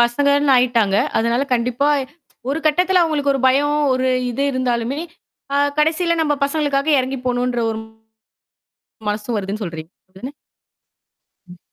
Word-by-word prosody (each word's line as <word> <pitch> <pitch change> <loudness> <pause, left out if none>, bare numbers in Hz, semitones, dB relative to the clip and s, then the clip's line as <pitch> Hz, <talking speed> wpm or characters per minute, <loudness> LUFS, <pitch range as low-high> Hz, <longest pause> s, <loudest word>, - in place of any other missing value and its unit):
பசங்கன்னு 280 +4 +3
ஆயிட்டாங்க. 235 -5 +2 0.2
அதனால 235 +3 +1
கண்டிப்பா 250 +4 0 0.6
ஒரு 290 - -1
கட்டத்துல 360 +4 +3
அவங்களுக்கு 295 -4 +1
ஒரு 270 - -1
பயம், 290 +3 +2 0.2
ஒரு 255 0 0 0.2
இது 260 +4 -2
இருந்தாலுமே, 255 +1 -1 0.5
அ - - +2 0.2
கடைசியில 335 +2 +2
நம்ம 295 -2 +1
பசங்களுக்காக 285 0 -1
எறங்கி 260 +1 -3
போணுன்ற 245 -1 0
ஒரு 220 0 -4 1.3
மனசு 210 +3 -3
வருதுன்னு 205 +2 -4
சொல்றீங்க 165 -1 -8 0.3
தானே? 260 +7 -7 1.2
ம் 180 - -13
260 Hz, 125 wpm, -19 LUFS, 235-290 Hz, 1.3 s, பசங்கன்னு